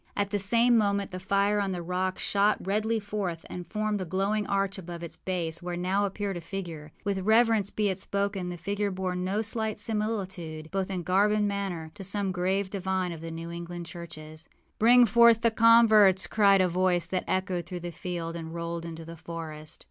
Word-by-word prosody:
At 200 -1 0
the 205 - 0
same 230 +4 +5
moment 200 -1 0
the 185 - -5
fire 200 +2 +1
on 195 -2 -1
the 175 -1 -4
rock 185 +2 -1
shot 205 +1 +2
redly 215 +3 0
forth 200 -5 -4
and 175 -2 -6
formed 210 0 -1
a - - -1
glowing 195 +4 -1
arch 195 0 0
above 170 -1 -8
its 170 - -7
base, 170 -3 -2
where 175 0 -4
now 190 +3 +1
appeared 200 -1 -4
a - - -6
figure. 165 -5 -7
With 200 -2 -1
reverence 220 0 +3
be 210 0 0
it 190 0 -2
spoken, 200 -2 -2
the 175 - -5
figure 200 +4 -2
bore 185 -1 -3
no 190 +4 -1
slight 220 -1 -2
similitude, 190 -8 -4
both 195 0 -1
in 185 -2 -3
garb 195 +5 +3
and 210 -1 +2
manner, 190 -6 -3
to 205 - -9
some 200 0 0
grave 190 +2 -1
divine 190 -2 -1
of 165 -2 -7
the 165 - -6
New 165 +1 -6
England 170 0 -6
churches. 160 -2 -10 0.3
âBring 240 +2 +7
forth 235 +1 +6
the 230 -1 +3
converts!â 220 -5 +6
cried 200 -3 +5
a 185 - +3
voice 180 -1 +1
that 185 +1 -2
echoed 185 -2 -1
through 180 -1 -6
the 175 0 -5
field 170 -1 -5
and 165 0 -6
rolled 170 0 -4
into 165 -1 -7
the 165 +1 -9
forest. 160 -2 -8
190 Hz, 200 wpm, -28 LUFS, 175-205 Hz, 0.3 s, âBring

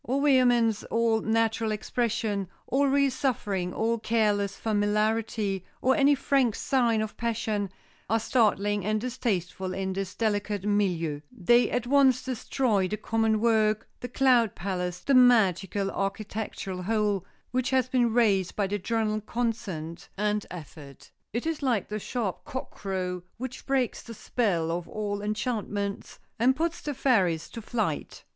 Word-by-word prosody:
All 270 +4 0
vehemence, 245 -6 +4
all 230 -1 +1
natural 225 0 +1
expression, 215 -2 -1 0.2
all 280 +2 +2
real 280 0 +3
suffering, 205 -9 -1
all 230 +4 0
careless 210 -3 +1
familiarity, 210 -2 0 0.2
or 265 +1 +3
any 285 -1 +5
frank 265 -4 +2
sign 235 -5 +1
of 215 - -6
passion, 220 -3 -1 0.4
are 225 +2 +3
startling 205 -3 +1
and 215 +2 0
distasteful 190 -6 -2
in 190 0 -2
this 195 0 -4
delicate 205 -3 -1
milieu; 180 -8 0
they 240 +7 +3
at 245 -1 -1
once 260 -1 +4
destroy 245 -5 0
the 210 - -3
common 220 0 +1
work, 215 -1 +2
the 245 - -5
cloud 245 -5 +3
palace, 180 -1 -3
the 280 - +1
magical 200 -6 +4
architectural 195 -1 -4
whole, 210 -1 0 0.3
which 255 0 0
has 260 -1 +2
been 245 -2 +2
raised 205 -6 +2
by 205 - +1
the 205 +2 -2
general 215 +1 -1
consent 210 -8 -4
and 210 0 0
effort. 150 -5 -11 0.2
It 235 +6 -3
is 325 -2 -2
like 245 -8 0
the 210 +1 -3
sharp 215 -3 -3
cock 260 -3 -6
crow 185 -2 -3 0.2
which 260 +1 -7
breaks 265 -3 0
the 230 - -10
spell 180 -9 0
of 170 0 -3
all 205 -1 -3
enchantments, 210 -2 -3 0.2
and 255 +3 +4
puts 330 +2 -1
the 295 -2 -4
fairies 190 - +2
to 230 - -7
flight. 215 -9 -3
215 Hz, 145 wpm, -27 LUFS, 195-245 Hz, 0.4 s, any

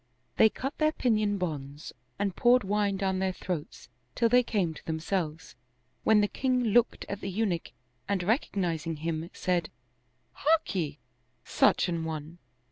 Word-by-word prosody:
They 220 - +7
cut 270 +6 -5
their 310 0 +3
pinion 215 -6 +1
bonds 150 -4 -5 0.2
and 200 -2 -1
poured 245 0 +4
wine 200 0 0
down 190 -1 0
their 190 0 +1
throats, 180 -4 -5 0.3
till 230 - +3
they 250 +2 +6
came 200 -9 -1
to - - -13
themselves, 160 0 -3 0.5
when 215 -1 +5
the 205 - +2
king 255 +2 0
looked 235 +1 +2
at 200 0 -5
the 195 - -3
Eunuch 190 -4 -1 0.4
and 195 -3 0
recognizing 175 - 0
him, 160 +1 -3
said, 175 -3 -1 0.6
"Harkye, 195 - 0 0.5
Such - - +3
an 170 -2 -2
one!" 160 +1 -6
190 Hz, 145 wpm, -29 LUFS, 165-220 Hz, 0.6 s, They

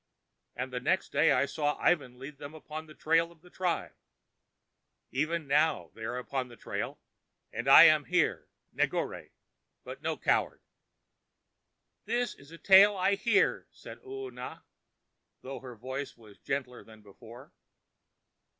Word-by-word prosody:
And 130 +1 -5
the 125 - -2
next 170 +9 0
day 165 - +4
I 130 - +3
saw 145 0 -1
Ivan 140 -8 +1
lead 140 +2 -10
them 145 +2 -9
upon 155 0 -8
the 155 - -14
trail 165 +1 +1
of 165 -2 -21
the 180 +1 -19
tribe. 180 -2 -2 1.2
Even 155 +4 -1
now 150 +2 +1
are - - -39
they 110 - -11
upon 125 +2 -3
the 120 - -13
trail, - - -5 0.5
and 120 - -4
I 135 - +10
am 155 -3 +6
here, 180 0 0 0.3
Negore, - - -2 0.5
but - - -9
no - - -2
coward." - - 0 1.4
"This 245 -1 -1
is 140 - -18
a 165 - -11
tale 195 +3 +6
I 190 +2 +2
hear," 205 +1 +1
said - - -12
Oona, 400 -2 -8 0.8
though 135 +1 -6
her 125 -2 -10
voice 130 +5 -6
was 110 -3 -17
gentler 130 -3 -4
than 110 -1 -17
before. 115 +5 -14
145 Hz, 145 wpm, -30 LUFS, 125-170 Hz, 1.4 s, I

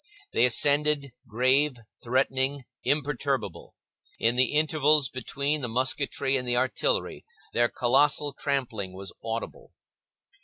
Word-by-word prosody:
They - - +4
ascended, 145 +2 +2 0.2
grave, 130 +6 +2 0.3
threatening, 130 +2 +1 0.2
imperturbable; 135 - -2 0.4
in 115 +2 +2
the 130 +1 +2
intervals 150 -2 +3
between 140 +4 -3
the 125 - -2
musketry 130 +3 0
and 125 -1 -5
the 120 0 +1
artillery, 485 - -1 0.3
their 120 0 +2
colossal 145 +3 +2
trampling 115 -9 -3
was 95 +1 -9
audible. 115 0 -6
130 Hz, 110 wpm, -26 LUFS, 120-145 Hz, 0.4 s, They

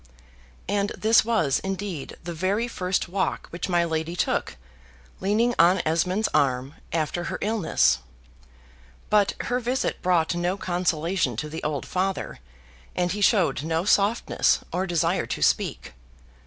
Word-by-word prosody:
And 200 +1 0
this 220 +1 +5
was, 215 - +1
indeed, 195 -5 -5
the 175 0 -5
very 195 +8 0
first 185 -6 -1
walk 190 +2 -1
which 170 +2 -4
my 175 -1 +2
lady 160 +1 -2
took, - - -1 0.6
leaning 220 +5 +2
on 175 +3 +6
Esmond's 180 +6 +1
arm, 135 -2 +1 0.2
after 165 +2 -1
her - - -3
illness. 210 -5 +2 1.1
But 210 -2 +3
her 245 +1 -1
visit 250 +2 -1
brought 175 -3 +2
no 175 +2 -1
consolation 175 - 0
to 150 +5 -3
the 160 +2 -6
old 150 -2 -2
father; 190 +1 -2 0.6
and 180 -1 0
he 205 - -3
showed 190 - +3
no 160 +3 -1
softness, 205 +2 +2
or 185 +2 -1
desire 170 -3 +1
to - - -4
speak. - - 0
180 Hz, 140 wpm, -25 LUFS, 165-200 Hz, 1.1 s, on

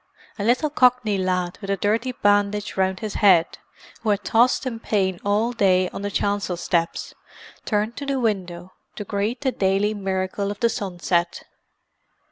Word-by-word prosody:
A - - -1
little 250 +7 +2
Cockney 250 -7 +3
lad 180 -1 -1
with 195 - -7
a 195 - +1
dirty 225 +6 0
bandage 205 -2 +1
round 190 0 0
his 215 -2 -4
head, 180 -5 +4 0.4
who 220 - -2
had 205 0 +1
tossed 245 +4 +3
in 235 -3 -4
pain 190 -5 0
all 210 +4 +1
day 185 -5 +2
on - - -7
the 205 - -2
chancel 200 -3 -1
steps, 170 -1 -1 0.5
turned 215 +2 -1
to 285 - -5
the 275 -1 0
window 185 -6 -2 0.2
to 210 - -5
greet 205 +5 -2
the 265 -2 +1
daily 195 0 +1
miracle 195 0 -2
of 205 - -6
the 235 - +3
sunset. 175 -4 -2
205 Hz, 165 wpm, -23 LUFS, 190-225 Hz, 0.5 s, head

